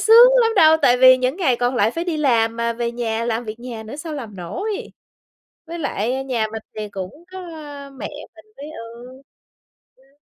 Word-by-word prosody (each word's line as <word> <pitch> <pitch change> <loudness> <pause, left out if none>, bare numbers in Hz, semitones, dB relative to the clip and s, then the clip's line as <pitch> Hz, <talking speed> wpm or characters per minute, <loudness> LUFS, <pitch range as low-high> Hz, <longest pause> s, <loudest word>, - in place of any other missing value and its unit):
sướng 470 +3 +8
lắm 455 - +3
đâu, 315 -3 +7
tại 245 -1 +5
vì 255 0 +8
những 255 +4 0
ngày 285 -11 +2
còn 245 +1 0
lại 215 -1 +3
phải 335 +7 -4
đi 345 -3 -2
làm 230 -6 +2
mà 235 0 0
về 235 0 -3
nhà 230 -1 -2
làm 235 0 -2
việc 220 +1 -7
nhà 240 -3 -7
nữa 220 +6 -8
sao 310 0 -6
làm 225 -8 -7
nổi. 390 - -4 0.8
Với 340 +1 -6
lại 260 -2 -2
nhà 235 -5 0
mình 220 -1 -5 0.2
thì 210 -1 -4
cũng 195 - -8
có 375 - -7 0.6
mẹ - - -4 0.3
mình - - -16
với 285 - -8
ừ. 240 +1 -11 0.7
Ừm. 270 +2 -28
250 Hz, 200 wpm, -21 LUFS, 230-300 Hz, 0.8 s, sướng